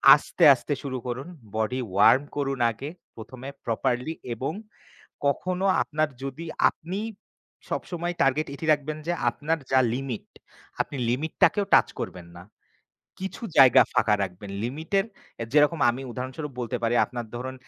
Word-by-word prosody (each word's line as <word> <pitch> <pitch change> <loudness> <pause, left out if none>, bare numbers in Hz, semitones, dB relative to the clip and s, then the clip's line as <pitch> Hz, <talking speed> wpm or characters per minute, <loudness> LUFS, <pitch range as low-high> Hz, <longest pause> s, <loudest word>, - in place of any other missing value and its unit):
আস্তে, 165 +3 -2
আস্তে, 135 +3 -3
শুরু 130 -2 -3
করুন। 125 +5 -4 0.3
Body 110 +4 0 0.2
Warm 105 +7 +6 0.2
করুন 135 -2 -1
আগে 135 +7 -7 0.3
১ম 120 +3 -10
এ - - -7
properly 125 +6 -1 0.2
এবং 135 +7 -3 0.7
কখনো 185 +6 0 0.2
আপনার 155 0 0 0.2
যদি 135 +5 -5 0.2
আপনি 180 +4 -6 0.7
সবসময় 175 0 -3
টার্গেট 140 +3 +2
এটি 160 - -6
রাখবেন 150 +1 -1
যে 175 - +1 0.2
আপনার 160 +6 -2
যা 130 0 +5
লিমিট, 130 -4 -4 0.5
আপনি 145 - -1
লিমিট 145 +6 -1
টাকেও 205 - +5
টাচ - - +6
করবেন 90 -2 -6
না। 85 - -10 0.8
কিছু 190 +4 -6 0.2
জায়গা 130 -1 +9
ফাঁকা 115 -4 +3
রাখবেন। 95 +2 -5
লিমিটের 160 +10 -1 0.4
এ - - -1
যেরকম 150 +2 +4
আমি 130 +3 -5
উদাহরণস্বরূপ 130 +4 -5
বলতে 125 +1 -2
পারি, 115 +1 +1
আপনার 120 -2 -6
ধরুন 130 +2 -5
135 Hz, 145 wpm, -26 LUFS, 120-155 Hz, 0.8 s, জায়গা